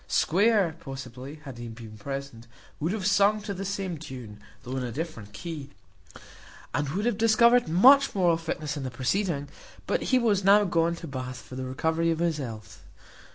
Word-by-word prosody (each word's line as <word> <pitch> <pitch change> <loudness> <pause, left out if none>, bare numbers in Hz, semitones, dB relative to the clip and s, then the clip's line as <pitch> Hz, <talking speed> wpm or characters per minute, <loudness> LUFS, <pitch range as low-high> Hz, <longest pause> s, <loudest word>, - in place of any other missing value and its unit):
Square, 195 -3 +2
possibly, 135 -1 -8
had 135 -5 -9
he 120 - -6
been 115 -1 -10
present, 135 0 -6 0.3
would 160 +4 -1
have 205 -2 -3
sung 200 +2 +4
to 205 -1 -4
the 195 +1 -5
same 190 -4 -3
tune, 125 -8 -9 0.2
though 125 +2 -5
in 130 - -2
a 120 - -4
different 120 -7 -6
key, 150 - -7 1.0
and 145 -1 -1
would 195 +9 -2
have 235 -3 0
discovered 235 +1 +5
much 260 - +6
moral 175 -3 +4
fitness 155 -2 -4
in 145 - -4
the 130 - -3
proceeding: 145 +4 -1 0.4
but - - 0
he 255 - +5
was 215 -5 +2
now 200 +2 +6
gone 170 -2 +1
to 170 - -8
Bath 130 -2 -5
for 130 - -12
the 130 0 -4
recovery 160 +6 0
of 165 - +1
his 170 -2 0
health. 110 -8 -7
160 Hz, 185 wpm, -27 LUFS, 130-195 Hz, 1.0 s, much